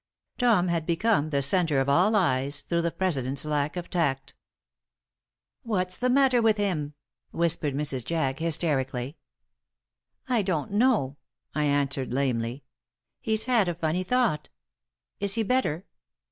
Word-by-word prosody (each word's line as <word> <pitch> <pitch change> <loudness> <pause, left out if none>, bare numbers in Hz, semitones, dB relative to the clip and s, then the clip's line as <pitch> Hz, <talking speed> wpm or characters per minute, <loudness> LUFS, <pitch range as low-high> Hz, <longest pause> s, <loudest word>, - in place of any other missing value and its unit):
Tom 225 -8 +3
had 165 -1 -1
become 170 -2 +1
the 140 -2 0
center 160 -1 +2
of 135 - 0
all 180 +10 +3
eyes 145 -6 +1
through 170 +3 -1
the 170 - 0
president's 140 -7 -2
lack 150 +2 -1
of 175 - -5
tact. 135 -6 -1 1.3
"What's 185 -7 -2
the 250 - +1
matter 260 -2 +4
with 220 -1 +3
him?" 155 -8 -2 0.3
whispered 165 -4 0
Mrs. 140 -4 -2
Jack, 150 -2 -1
hysterically. 145 -5 -1 1.1
"I 245 -4 +2
don't 180 -6 -2
know," 205 - +2 0.4
I 150 -1 0
answered, 140 -3 0
lamely. 125 -1 -1 0.6
"He's 220 -1 -1
had 235 -7 +3
a 175 - -2
funny 165 +2 -1
thought. 205 -6 0 0.7
Is 200 +1 0
he 225 - +1
better?" 205 -8 0
165 Hz, 135 wpm, -26 LUFS, 140-200 Hz, 1.3 s, matter